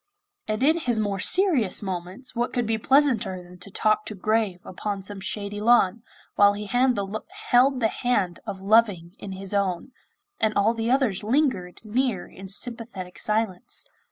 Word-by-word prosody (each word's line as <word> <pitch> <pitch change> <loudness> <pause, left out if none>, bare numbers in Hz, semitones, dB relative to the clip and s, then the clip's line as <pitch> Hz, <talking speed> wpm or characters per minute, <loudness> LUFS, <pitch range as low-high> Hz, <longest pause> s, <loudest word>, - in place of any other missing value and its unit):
And 215 +3 -1
in 315 +4 +4
his 240 -8 0
more 200 -2 -1
serious 285 - +3
moments 190 +7 -5
what 240 +1 -1
could 245 -1 0
be 220 0 -1
pleasanter 235 -9 +2
than 180 0 -15
to 180 - -8
talk 215 +2 +1
to 215 - -3
Grave 215 -1 0
upon 200 +1 -4
some 200 0 -8
shady 205 +1 -3
lawn, 230 -2 +4 0.3
while 205 0 +5
he 210 +1 -5
held 250 +3 +2
the 230 +4 +1
hand 205 -8 0
of 190 - -5
Loving 195 -4 +2
in 195 - -7
his 195 +1 -6
own, 195 +3 -1 0.5
and 215 -1 +1
all 210 +3 +3
the 230 0 -2
others 250 -7 +1
lingered 225 -7 0
near 230 -3 -1
in 190 - -11
sympathetic 205 -3 -3
silence? 220 +1 -2
215 Hz, 160 wpm, -25 LUFS, 195-240 Hz, 0.5 s, while